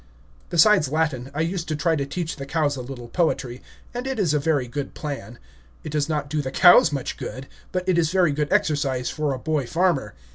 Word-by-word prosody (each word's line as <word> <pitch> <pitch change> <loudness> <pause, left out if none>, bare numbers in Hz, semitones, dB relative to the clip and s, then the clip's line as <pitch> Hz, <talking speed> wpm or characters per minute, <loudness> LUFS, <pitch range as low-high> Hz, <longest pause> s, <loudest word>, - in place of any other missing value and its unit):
Besides 175 -3 +5
Latin, 155 -5 -1
I 145 +2 -2
used 170 +1 -2
to 155 - -1
try 165 +2 +1
to 140 -2 -2
teach 165 +3 -4
the 135 -1 -7
cows 150 -1 0
a 130 - -5
little 125 -1 -8
poetry, 135 -5 -1 0.3
and 245 +2 -4
it 265 - -2
is 180 -8 +1
a 150 - +2
very 145 -4 0
good 140 +3 -5
plan. 135 -7 -6 0.5
It 155 - -6
does 150 0 0
not 150 -2 -1
do 150 +1 -1
the 130 - -4
cows 170 +2 +6
much 140 -3 -3
good, 130 +1 -6 0.3
but 185 0 -3
it 180 -2 +3
is 160 -2 +1
very 180 -4 +3
good 145 0 -2
exercise 135 -4 +1
for 150 -2 -1
a 135 - -2
boy 150 -1 -1
farmer. 165 - 0
150 Hz, 220 wpm, -23 LUFS, 135-165 Hz, 0.5 s, cows